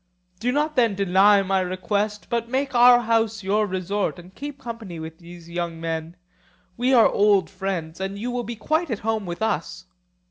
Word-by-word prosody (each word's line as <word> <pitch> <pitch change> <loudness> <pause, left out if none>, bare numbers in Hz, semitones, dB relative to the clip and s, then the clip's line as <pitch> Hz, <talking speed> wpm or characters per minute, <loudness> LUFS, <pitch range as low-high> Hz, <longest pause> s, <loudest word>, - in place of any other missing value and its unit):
Do 245 +4 0
not 300 +3 0
then 230 -5 +3
deny 195 +1 +4
my 195 0 +1
request, 200 +3 -2
but 235 0 -1
make 270 +2 -1
our 245 0 +7
house 225 -2 0
your 210 +2 +1
resort 190 +1 -2
and 180 +1 -13
keep 290 +3 -7
company 225 -9 -7
with 160 0 -8
these 170 -1 -13
young 170 -1 -4
men; 165 0 -4 0.6
we 250 +5 +1
are 240 -4 +7
old 200 -3 +3
friends, 185 -4 -4
and 195 +1 -4
you 240 +4 -3
will 245 0 -2
be 235 +1 -6
quite 310 +9 -1
at 225 - -1
home 220 -3 -1
with 175 +5 -4
us. 185 -2 -2
205 Hz, 185 wpm, -23 LUFS, 185-235 Hz, 0.6 s, our